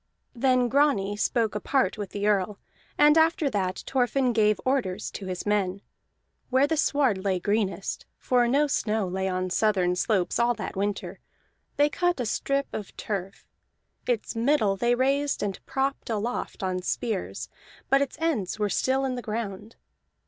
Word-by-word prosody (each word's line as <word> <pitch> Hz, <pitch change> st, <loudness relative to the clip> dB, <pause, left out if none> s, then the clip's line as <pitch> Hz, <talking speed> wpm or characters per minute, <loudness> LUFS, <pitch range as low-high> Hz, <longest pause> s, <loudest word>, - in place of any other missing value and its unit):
Then 255 Hz, 0 st, +2 dB
Grani 245 Hz, -7 st, +2 dB
spoke 225 Hz, +1 st, 0 dB
apart 260 Hz, +6 st, +1 dB
with 205 Hz, -4 st, -5 dB
the 205 Hz, 0 st, -3 dB
Earl, 205 Hz, -1 st, +1 dB, 0.4 s
and 300 Hz, +2 st, +6 dB
after 320 Hz, -3 st, +2 dB
that 190 Hz, -3 st, -2 dB
Thorfinn 255 Hz, -1 st, +1 dB
gave 215 Hz, -2 st, +3 dB
orders 215 Hz, -7 st, -1 dB
to 195 Hz, -, -7 dB
his 180 Hz, -1 st, -4 dB
men. 200 Hz, -2 st, 0 dB, 0.7 s
Where 260 Hz, +2 st, +4 dB
the 320 Hz, +2 st, 0 dB
sward 270 Hz, -10 st, +1 dB
lay 190 Hz, -2 st, +1 dB
greenest 205 Hz, 0 st, -1 dB
(for 245 Hz, -1 st, +2 dB
no 280 Hz, +5 st, +3 dB
snow 220 Hz, -7 st, 0 dB
lay 190 Hz, +1 st, -2 dB
on 185 Hz, -1 st, -2 dB
southern 185 Hz, -4 st, +2 dB
slopes 190 Hz, +1 st, 0 dB
all 240 Hz, 0 st, +3 dB
that -, -, -6 dB
winter) 195 Hz, -2 st, -3 dB, 0.6 s
they 290 Hz, -, +5 dB
cut 350 Hz, +2 st, 0 dB
a 245 Hz, -, -1 dB
strip 275 Hz, +5 st, 0 dB
of 210 Hz, -3 st, -6 dB
turf; 195 Hz, -2 st, -5 dB, 0.6 s
its 240 Hz, -1 st, -1 dB
middle 225 Hz, -4 st, +2 dB
they 240 Hz, +4 st, +2 dB
raised 275 Hz, +3 st, +1 dB
and 195 Hz, -2 st, -4 dB
propped 270 Hz, -1 st, -2 dB
aloft 225 Hz, -1 st, -3 dB
on 185 Hz, -1 st, -1 dB
spears, 210 Hz, +2 st, -3 dB, 0.4 s
but 275 Hz, 0 st, +4 dB
its 280 Hz, -, -2 dB
ends 295 Hz, -, -1 dB
were 210 Hz, -1 st, 0 dB
still 265 Hz, +5 st, +1 dB
in 260 Hz, -, -1 dB
the 245 Hz, -, -4 dB
ground. 215 Hz, -1 st, -5 dB
220 Hz, 160 wpm, -26 LUFS, 195-265 Hz, 0.7 s, and